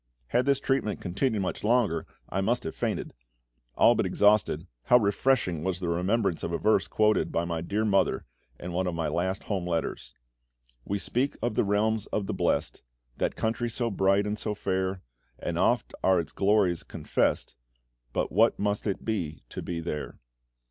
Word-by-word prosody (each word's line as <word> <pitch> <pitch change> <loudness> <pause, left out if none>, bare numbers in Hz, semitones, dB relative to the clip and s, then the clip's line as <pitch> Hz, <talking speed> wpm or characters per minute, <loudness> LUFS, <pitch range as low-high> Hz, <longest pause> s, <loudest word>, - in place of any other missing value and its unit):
Had 125 - +2
this 140 -1 +3
treatment 135 -7 0
continued 105 +3 -1
much 90 - -4
longer, 105 -8 +2 0.2
I 95 - -1
must 120 +5 +1
have 80 - -4
fainted. - - -3 0.6
All - - +6
but - - 0
exhausted, 105 -1 +3 0.2
how 125 - +7
refreshing 100 - +1
was 95 -1 -1
the 90 -2 -2
remembrance 90 +2 +1
of 85 - -3
a 85 - 0
verse 110 - +2
quoted 110 0 +2
by 85 - 0
my 85 -1 -2
dear 105 +6 -1
mother 100 -2 +2 0.3
in 90 - -6
one 90 +1 0
of 90 - -2
my 85 -1 -1
last 95 +2 -1
home 95 -4 -2
letters 85 -3 -3 0.7
"We 100 - -1
speak 125 +7 -1
of 120 - 0
the - - +2
realms 105 +1 +1
of 105 - -2
the 105 - -3
blest, 85 - 0 0.4
That - - -1
country 115 +2 -1
so 115 0 -2
bright 100 +1 +2
and 105 +1 -2
so 105 -1 -2
fair, 95 -1 -2 0.3
And - - -3
oft - - +2
are 95 -1 +4
its 85 - -4
glories 100 -4 +2
confessed; - - -1 0.6
But - - -1
what 110 +6 +4
must 105 +1 -1
it 100 - -2
be 90 - -3
to - - -6
be 85 -1 -4
there!" 75 -2 -5
100 Hz, 180 wpm, -28 LUFS, 90-110 Hz, 0.7 s, how